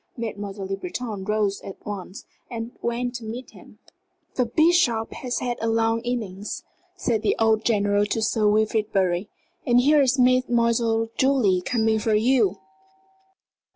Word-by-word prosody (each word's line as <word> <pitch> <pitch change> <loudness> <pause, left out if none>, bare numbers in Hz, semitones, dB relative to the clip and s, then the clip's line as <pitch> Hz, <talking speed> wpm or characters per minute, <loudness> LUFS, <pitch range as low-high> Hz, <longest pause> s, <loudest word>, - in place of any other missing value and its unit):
Mademoiselle 205 -3 -5
Le 195 +1 -2
Breton 200 +2 -5
rose 210 -1 0
at 195 - -8
once 195 -1 -7 0.2
and 230 -1 -5
went 245 +1 -2
to 240 -2 -6
meet 235 +4 -7
him. - - -16 0.6
"The 250 -2 0
Bishop 310 -6 +2
has 250 -1 -4
had 245 -1 -2
a 225 - 0
long 225 0 +1
innings," 215 -5 -4 0.3
said 235 - -1
an - - +3
old 220 -1 +2
general 205 -2 +2
to 225 - -1
Sir 220 -1 +2
Wilfrid 215 0 +1
Bury. 185 0 0 0.3
"And 240 0 +4
here 290 +3 +5
is 265 0 +2
Mademoiselle 235 -3 +2
Julie 250 -9 +3
coming 220 +2 +1
for 215 0 +1
you." 220 -3 +2
225 Hz, 150 wpm, -24 LUFS, 205-245 Hz, 0.6 s, here